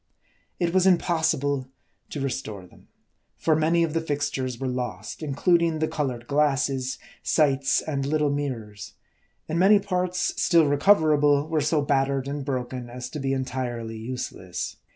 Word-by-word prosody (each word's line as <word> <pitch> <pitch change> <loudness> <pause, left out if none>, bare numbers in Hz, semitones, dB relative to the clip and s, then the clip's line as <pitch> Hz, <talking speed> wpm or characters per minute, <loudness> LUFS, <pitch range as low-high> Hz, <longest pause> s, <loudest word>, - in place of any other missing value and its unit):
It 170 -1 0
was 185 0 +4
impossible 160 -7 +1 0.4
to 145 - -5
restore 110 -8 -4
them; - - -20 0.5
for 160 - +2
many 165 +2 +2
of 160 -2 -1
the 165 - 0
fixtures 140 -5 -2
were 135 +1 -3
lost, 120 - -4
including 165 +3 +2
the 155 0 0
colored 130 -7 -3
glasses, 135 -2 +1 0.2
sights, 140 -3 +2
and 140 -3 -3
little 150 +1 +1
mirrors; 120 -8 -4 0.5
and 160 +2 -1
many 200 +3 +6
parts 180 -3 -1
still 165 -2 +5
recoverable, 145 -2 +4
were 160 -1 0
so 150 0 +1
battered 135 -1 +1
and 140 0 -3
broken 125 -2 -4
as 125 +1 -7
to 150 - -5
be 135 -1 -1
entirely 125 -4 -3
useless. 95 -7 -5
145 Hz, 145 wpm, -25 LUFS, 130-160 Hz, 0.5 s, many